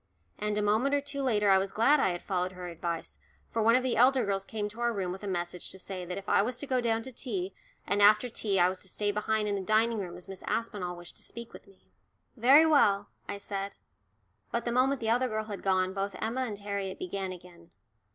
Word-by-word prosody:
And 210 0 -1
a 210 - +1
moment 225 +7 +2
or 285 - +1
two 280 0 -5
later 210 -6 +3
I 190 - +6
was 195 0 -2
glad 275 +7 +4
I 190 - +3
had 175 -1 -4
followed 185 -1 -1
her 180 -1 -7
advice, 170 0 -4 0.3
for 230 - 0
one 230 +2 +5
of 255 - +3
the 255 -2 0
elder 255 0 +5
girls 195 -1 -1
came 210 -2 -3
to 220 +3 -12
our 240 0 +2
room 190 -5 -2
with 190 +3 -7
a - - -4
message 175 -1 -3
to - - -6
say 185 -1 -6
that 180 +3 -5
I - - +4
was 240 +4 -2
to 285 - -4
go 255 -2 +1
down 225 -1 0
to 260 - -8
tea, 360 +10 -4 0.3
and 205 0 +1
after 210 +4 +6
tea 205 -4 0
I 175 - +6
was 185 +1 -3
to - - -5
stay 205 +2 0
behind 210 +1 0
in 205 - 0
the 200 - -1
dining 220 +3 +2
room 175 -3 -5
as 180 - -12
Miss 195 -1 -9
Aspinall 205 -6 -2
wished 175 0 -11
to - - -10
speak 235 0 -7
to - - -10
me. 195 - -23 0.5
"Very 270 +6 +7
well," 205 -10 +4 0.2
I - - -3
said. 200 0 -5 0.7
But 235 0 -2
the 235 - 0
moment 260 +2 +2
the 220 - -1
other 250 +2 +2
girl 215 -2 -2
had 210 -2 -6
gone 185 -1 +1
both 195 0 -3
Emma 240 +4 -1
and 210 -4 -5
Harriet 200 -2 -4
began 190 +1 -4
again. 175 -2 -13
205 Hz, 250 wpm, -30 LUFS, 190-235 Hz, 0.7 s, Very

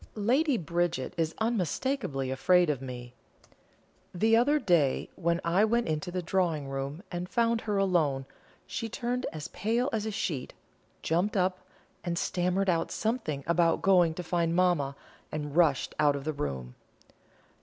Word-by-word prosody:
Lady 255 +7 +2
Bridget 170 -5 -1
is 165 -1 -1
unmistakably 205 - -1
afraid 175 +5 +4
of 135 -3 -4
me. 125 -2 -7 1.0
The 220 +5 +4
other 270 +6 +4
day 170 - +2
when 170 -1 0
I 175 +5 +3
went 235 +2 +2
into 155 +1 -2
the 180 0 -3
drawing 165 -5 0
room 135 +6 -4
and 175 0 -4
found 230 -1 +1
her 210 -2 -1
alone, 160 -9 +1 0.4
she 230 -3 -4
turned 245 +1 -2
as 150 -5 -6
pale 235 - 0
as 220 -1 -1
a - - -2
sheet, 150 -9 -3 0.5
jumped 180 +6 +1
up, 185 0 +1 0.4
and 175 -1 -2
stammered 180 +2 0
out 165 -2 +1
something 215 - -2
about 170 0 +2
going 180 -4 +4
to 180 - -5
find 170 -1 0
mamma, 175 -7 +2 0.4
and 150 -1 -4
rushed 160 -6 +3
out 145 -1 +4
of 140 - -5
the 155 +1 -2
room. 65 - -4
175 Hz, 155 wpm, -29 LUFS, 150-210 Hz, 1.0 s, afraid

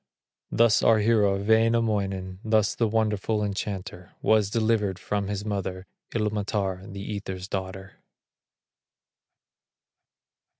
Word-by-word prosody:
Thus 115 -2 +4
our 115 - +5
hero, 105 -2 +3
Wainamoinen, 105 -4 +1
Thus 110 -2 +2
the 115 - +1
wonderful 110 -1 0
enchanter 95 -3 -5
Was 110 -2 +3
delivered 110 -3 +1
from 100 +1 -2
his 100 0 -3
mother, 95 -3 -3 0.3
Ilmatar, 105 -3 -2
the 100 0 -7
Ether's 95 -3 -5
daughter. 95 0 -6
105 Hz, 95 wpm, -26 LUFS, 95-110 Hz, 0.3 s, our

